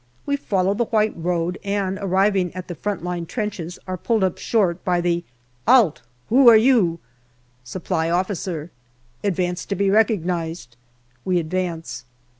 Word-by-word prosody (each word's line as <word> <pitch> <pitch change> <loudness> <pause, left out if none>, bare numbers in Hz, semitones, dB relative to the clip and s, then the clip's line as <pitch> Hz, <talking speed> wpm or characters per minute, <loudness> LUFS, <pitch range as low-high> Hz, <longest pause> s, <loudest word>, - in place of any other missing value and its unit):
We 285 - +1
follow 195 -7 0
the 235 +3 0
white 215 -1 +1
road, 175 +1 -2
and 200 -1 -1
arriving 190 -1 +2
at 185 -1 -6
the 175 - -5
front 205 +2 -4
line 175 -1 -3
trenches 190 -6 -4
are 185 -1 -4
pulled 225 0 +1
up 185 -2 0
short 185 -6 +1
by 180 -1 +1
the 175 0 0 0.2
" 125 +4 -38
'Alt, 230 - +5 0.3
who 255 +1 +7
are 225 - +9
you? 220 -8 +3 0.2
" 120 0 -38
" 125 0 -38
Supply 165 -2 -1
Officer." 175 -2 -2 0.3
" 125 0 -37
Advance 180 -2 -1
to 200 - -2
be 195 0 +1
recognized." 175 - 0 0.5
We 185 -1 +1
advance. 165 -5 -3
180 Hz, 165 wpm, -22 LUFS, 170-205 Hz, 0.5 s, are